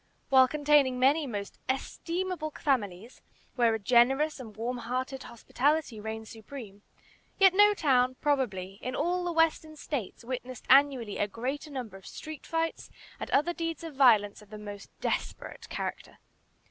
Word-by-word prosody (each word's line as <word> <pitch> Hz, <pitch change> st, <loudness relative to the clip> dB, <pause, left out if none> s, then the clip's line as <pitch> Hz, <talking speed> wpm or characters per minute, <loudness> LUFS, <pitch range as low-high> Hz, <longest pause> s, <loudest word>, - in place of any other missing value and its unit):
While 260 Hz, -1 st, +7 dB
containing 290 Hz, -3 st, +3 dB
many 280 Hz, +4 st, +3 dB
most 205 Hz, -4 st, -6 dB
estimable 335 Hz, +5 st, -2 dB
families, 225 Hz, -5 st, -1 dB, 0.3 s
where 235 Hz, -3 st, +3 dB
a -, -, 0 dB
generous 260 Hz, +7 st, +3 dB
and 220 Hz, -5 st, -10 dB
warm 240 Hz, +3 st, -2 dB
hearted 255 Hz, +3 st, -3 dB
hospitality 260 Hz, +1 st, -1 dB
reigned 220 Hz, +1 st, -6 dB
supreme, 220 Hz, -3 st, -10 dB, 0.6 s
yet 385 Hz, -2 st, +6 dB
no 415 Hz, +1 st, +6 dB
town, 255 Hz, -6 st, +2 dB
probably, 200 Hz, -10 st, -1 dB
in 255 Hz, -, -4 dB
all 355 Hz, +4 st, 0 dB
the 350 Hz, -, -1 dB
Western 325 Hz, -1 st, +1 dB
States 265 Hz, -8 st, -5 dB
witnessed 255 Hz, 0 st, -6 dB
annually 265 Hz, -5 st, +4 dB
a 205 Hz, -, +1 dB
greater 260 Hz, +8 st, -4 dB
number 245 Hz, -8 st, -6 dB
of 190 Hz, -, -14 dB
street 310 Hz, -2 st, -9 dB
fights 330 Hz, 0 st, -2 dB, 0.3 s
and -, -, -5 dB
other 320 Hz, +5 st, +2 dB
deeds 330 Hz, -2 st, -4 dB
of 325 Hz, -2 st, -7 dB
violence 220 Hz, -7 st, +4 dB
of 210 Hz, -, -17 dB
the 215 Hz, -, -8 dB
most 205 Hz, -1 st, -9 dB
desperate -, -, -4 dB
character. -, -, -5 dB
260 Hz, 150 wpm, -29 LUFS, 225-300 Hz, 0.6 s, While